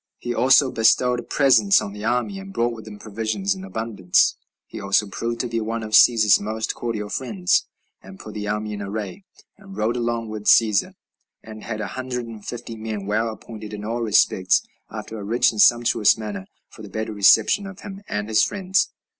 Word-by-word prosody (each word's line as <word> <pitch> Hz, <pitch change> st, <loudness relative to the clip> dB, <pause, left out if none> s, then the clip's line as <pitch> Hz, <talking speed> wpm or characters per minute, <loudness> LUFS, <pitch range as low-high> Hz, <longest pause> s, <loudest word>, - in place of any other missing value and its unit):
He 120 Hz, -, -4 dB
also 130 Hz, +3 st, +4 dB
bestowed 120 Hz, +2 st, +2 dB
presents 145 Hz, +8 st, +4 dB
on 100 Hz, -, -6 dB
the 105 Hz, 0 st, -9 dB
army, 125 Hz, -, -1 dB
and 195 Hz, 0 st, -10 dB
brought 115 Hz, -, -2 dB
them 105 Hz, -1 st, -10 dB
provisions 105 Hz, -2 st, -2 dB
in 95 Hz, -1 st, -9 dB
abundance. 95 Hz, -2 st, +1 dB, 0.3 s
He -, -, -9 dB
also 100 Hz, +2 st, +2 dB
proved 115 Hz, +4 st, -4 dB
to 125 Hz, -, -3 dB
be 115 Hz, -1 st, -2 dB
one 115 Hz, +1 st, -3 dB
of 110 Hz, -, -7 dB
Cæsar's 110 Hz, -2 st, +6 dB
most 110 Hz, +2 st, -3 dB
cordial 115 Hz, -3 st, -4 dB
friends, 105 Hz, -9 st, 0 dB, 0.3 s
and 95 Hz, 0 st, -13 dB
put 110 Hz, -, -10 dB
the 105 Hz, -1 st, -5 dB
army 105 Hz, 0 st, -3 dB
in 105 Hz, -, -6 dB
array, 105 Hz, -, -6 dB, 0.3 s
and 195 Hz, -1 st, -13 dB
rode 110 Hz, +2 st, 0 dB
along 120 Hz, -2 st, -2 dB
with 110 Hz, -1 st, -7 dB
Cæsar, 110 Hz, -3 st, +3 dB, 0.5 s
and 110 Hz, -1 st, -11 dB
had 110 Hz, -2 st, -5 dB
a -, -, -3 dB
hundred 125 Hz, -2 st, -4 dB
and 110 Hz, -3 st, -10 dB
fifty 115 Hz, 0 st, -7 dB
men, 110 Hz, -2 st, -5 dB
well 110 Hz, +3 st, 0 dB
appointed 110 Hz, -1 st, -10 dB
in 105 Hz, 0 st, -8 dB
all 115 Hz, +2 st, -3 dB
respects, 95 Hz, -4 st, +2 dB, 0.3 s
after 110 Hz, -, -7 dB
a -, -, -7 dB
rich 115 Hz, +4 st, +2 dB
and 110 Hz, -2 st, 0 dB
sumptuous 120 Hz, -3 st, +4 dB
manner, 105 Hz, -3 st, -6 dB, 0.2 s
for -, -, -15 dB
the -, -, -10 dB
better 110 Hz, 0 st, -4 dB
reception 110 Hz, -, +4 dB
of 195 Hz, -1 st, -11 dB
him 195 Hz, 0 st, -9 dB
and 105 Hz, 0 st, -3 dB
his 110 Hz, -1 st, +3 dB
friends. 190 Hz, -1 st, 0 dB
110 Hz, 195 wpm, -22 LUFS, 105-120 Hz, 0.5 s, Cæsar's